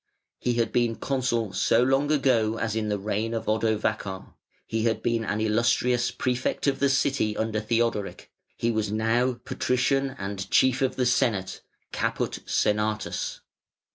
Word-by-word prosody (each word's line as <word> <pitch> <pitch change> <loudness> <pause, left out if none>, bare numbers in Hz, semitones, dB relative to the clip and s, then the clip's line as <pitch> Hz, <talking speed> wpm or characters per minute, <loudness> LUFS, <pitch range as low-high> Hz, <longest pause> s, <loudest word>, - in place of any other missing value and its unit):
He 120 - 0
had 115 -2 0
been 120 -1 +1
consul 120 -6 -1
so 115 +5 +3
long 135 +3 +2
ago 120 -7 +2
as 110 -1 -2
in 110 -1 -1
the 105 - 0
reign 110 +3 -2
of 115 - -3
Odovacar, 110 -3 -1 0.3
he 115 0 -2
had 115 - 0
been 115 -1 +1
an 105 -1 -2
"Illustrious" 120 +2 +2
Prefect 125 -2 -2
of 140 -2 +1
the 140 - +3
City 135 -5 +1
under 110 -1 -1
Theodoric; 115 -2 -1 0.3
he 115 - 0
was 110 -2 -1
now 115 +4 +1
Patrician 135 +1 0
and 100 -2 -5
Chief 130 +1 +3
of 130 -1 +1
the 125 - 0
Senate 105 -6 0 0.3
(Caput - - -2
Senatus). 105 0 -1
115 Hz, 150 wpm, -26 LUFS, 110-125 Hz, 0.3 s, so